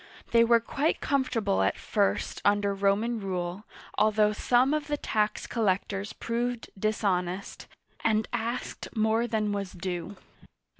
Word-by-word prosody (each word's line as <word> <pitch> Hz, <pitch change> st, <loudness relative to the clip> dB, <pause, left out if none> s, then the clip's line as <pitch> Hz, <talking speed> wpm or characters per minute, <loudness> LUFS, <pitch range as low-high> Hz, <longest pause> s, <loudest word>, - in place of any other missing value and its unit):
They 230 Hz, 0 st, +6 dB
were 235 Hz, 0 st, +5 dB
quite 280 Hz, +7 st, -1 dB
comfortable 240 Hz, -8 st, +1 dB
at -, -, +1 dB
first 200 Hz, -2 st, 0 dB
under 205 Hz, 0 st, +3 dB
Roman 200 Hz, +4 st, +1 dB
rule, 185 Hz, 0 st, -3 dB, 0.3 s
although 215 Hz, 0 st, +4 dB
some 250 Hz, +5 st, +3 dB
of 305 Hz, 0 st, -1 dB
the 295 Hz, 0 st, -1 dB
tax 210 Hz, -5 st, -1 dB
collectors 200 Hz, -2 st, -1 dB
proved 240 Hz, 0 st, -3 dB
dishonest, 195 Hz, -3 st, -1 dB, 0.4 s
and 220 Hz, -1 st, +2 dB
asked 240 Hz, +1 st, -3 dB
more 220 Hz, +2 st, +2 dB
than 215 Hz, -2 st, 0 dB
was 200 Hz, -2 st, -3 dB
due. 185 Hz, +1 st, -5 dB
215 Hz, 130 wpm, -28 LUFS, 200-235 Hz, 0.4 s, They